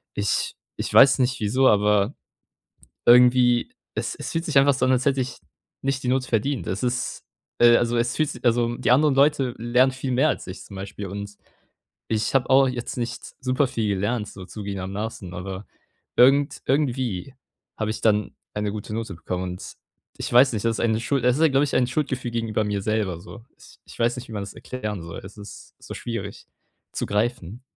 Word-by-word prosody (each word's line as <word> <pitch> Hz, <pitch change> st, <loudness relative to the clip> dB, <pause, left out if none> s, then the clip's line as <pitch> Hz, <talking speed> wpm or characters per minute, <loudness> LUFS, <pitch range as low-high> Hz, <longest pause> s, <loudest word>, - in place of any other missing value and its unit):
Ich 100 Hz, -1 st, 0 dB, 0.2 s
ich -, -, -4 dB
weiß 135 Hz, 0 st, +7 dB
nicht 130 Hz, 0 st, +1 dB
wieso, 130 Hz, +5 st, +2 dB
aber 105 Hz, +2 st, +3 dB, 0.9 s
irgendwie, 125 Hz, -, +5 dB, 0.2 s
es -, -, -3 dB
es -, -, -6 dB
fühlt 165 Hz, 0 st, -1 dB
sich 155 Hz, -6 st, +3 dB
einfach 140 Hz, 0 st, +5 dB
so 130 Hz, -, 0 dB
und 130 Hz, -, +3 dB
als 125 Hz, 0 st, +1 dB
hätte 135 Hz, -1 st, +2 dB
ich 125 Hz, -, -4 dB, 0.4 s
nicht 135 Hz, -1 st, -1 dB
die 125 Hz, -, -3 dB
Note 130 Hz, 0 st, +1 dB
verdient. 125 Hz, +5 st, -1 dB
Es 95 Hz, +2 st, -3 dB
ist 125 Hz, 0 st, -2 dB, 0.3 s
äh, 120 Hz, 0 st, +7 dB
also, 120 Hz, 0 st, +1 dB
es 120 Hz, 0 st, 0 dB
fühlt 155 Hz, -2 st, +1 dB
sich 125 Hz, -, -10 dB
also, 120 Hz, 0 st, +2 dB
die 125 Hz, -, 0 dB
anderen 140 Hz, +3 st, +4 dB
Leute 135 Hz, -3 st, +3 dB
lernen 125 Hz, +3 st, +3 dB
viel 130 Hz, 0 st, -4 dB
mehr 135 Hz, +5 st, +3 dB
als -, -, -2 dB
ich 95 Hz, 0 st, -8 dB
zum 100 Hz, -, -11 dB
Beispiel. 100 Hz, +1 st, -6 dB
Und 100 Hz, +2 st, -7 dB, 0.7 s
ich 110 Hz, +4 st, -1 dB
habe 135 Hz, -2 st, +2 dB
auch 135 Hz, +1 st, +6 dB
jetzt 125 Hz, -2 st, -4 dB
nicht 120 Hz, -1 st, -5 dB
superviel 130 Hz, -4 st, 0 dB
gelernt, 105 Hz, +2 st, -1 dB
so 95 Hz, -, -10 dB
zugebenermaßen, 100 Hz, -1 st, -5 dB
aber 95 Hz, +2 st, -6 dB, 0.5 s
irgend 140 Hz, +3 st, +4 dB
irgendwie 130 Hz, -5 st, -1 dB, 0.4 s
habe 110 Hz, -1 st, -2 dB
ich 110 Hz, -, -4 dB
dann 105 Hz, -1 st, +1 dB, 0.2 s
eine 105 Hz, -1 st, -2 dB
gute 105 Hz, 0 st, -6 dB
Note 110 Hz, -3 st, -4 dB
bekommen. 90 Hz, +2 st, -4 dB
Und 90 Hz, -, -9 dB, 0.4 s
ich -, -, -5 dB
weiß 125 Hz, +2 st, +6 dB
nicht, 110 Hz, -2 st, -3 dB
das 115 Hz, -, +2 dB
ist -, -, -5 dB
eine 110 Hz, -1 st, +1 dB
Schuld 135 Hz, +1 st, -1 dB
das 125 Hz, 0 st, +4 dB
ist 155 Hz, -, 0 dB
ja, 160 Hz, -, +6 dB
glaube 135 Hz, +1 st, +3 dB
ich, 145 Hz, -, -3 dB
ein 125 Hz, -, +3 dB
Schuldgefühl 130 Hz, -2 st, -2 dB
gegenüber 115 Hz, -2 st, -1 dB
mir 105 Hz, -1 st, -1 dB
selber 100 Hz, -5 st, -1 dB
so. 110 Hz, +4 st, -12 dB
Ich -, -, -17 dB
ich -, -, -14 dB
weiß 120 Hz, +1 st, +1 dB
nicht, 125 Hz, -, -8 dB
wie -, -, -9 dB
man 105 Hz, -2 st, -3 dB
das 100 Hz, -, -8 dB
erklären 105 Hz, -7 st, -5 dB
soll. 85 Hz, 0 st, -8 dB
Es 100 Hz, +2 st, -11 dB
ist 105 Hz, -1 st, -12 dB
so -, -, -10 dB
schwierig 100 Hz, -4 st, -6 dB, 0.5 s
zu -, -, -2 dB
greifen. 115 Hz, +1 st, -2 dB
120 Hz, 200 wpm, -24 LUFS, 105-130 Hz, 0.9 s, weiß